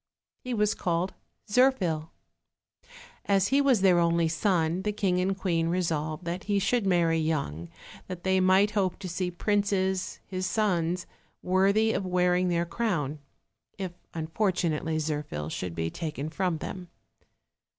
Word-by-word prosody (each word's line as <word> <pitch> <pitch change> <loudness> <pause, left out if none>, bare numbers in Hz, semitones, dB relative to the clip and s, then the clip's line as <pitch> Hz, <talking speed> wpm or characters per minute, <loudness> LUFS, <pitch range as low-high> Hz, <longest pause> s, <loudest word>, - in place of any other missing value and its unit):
He 250 -1 -4
was 210 -1 +2
called 175 +2 -1 0.3
Zirphil. 205 -10 +2 1.2
As 195 -1 +2
he 275 +1 +4
was 265 -7 +3
their 185 -3 +5
only 170 -1 +3
son, 170 0 +1
the 210 +2 -1
king 195 -3 0
and 190 +1 0
queen 170 -4 0
resolved 165 -2 -1
that 175 +3 -4
he 205 -1 +1
should 200 +2 +1
marry 170 -3 +3
young, 140 - -2 0.4
that 180 -2 -7
they 190 0 +2
might 190 +3 +4
hope 195 -4 0
to 195 - -7
see 180 +1 -2
princes, 190 0 0
his 185 -1 -3
sons, 180 -5 0 0.4
worthy 200 +4 +3
of - - -1
wearing 180 0 +2
their 170 0 +1
crown, 170 - -2 0.6
if 190 -3 -4 0.2
unfortunately 160 -2 0
Zirphil 150 - -3
should 90 0 -4
be 80 0 -2
taken 155 -3 -4
from 180 -2 0
them. 180 +3 -6
180 Hz, 140 wpm, -28 LUFS, 165-195 Hz, 1.2 s, their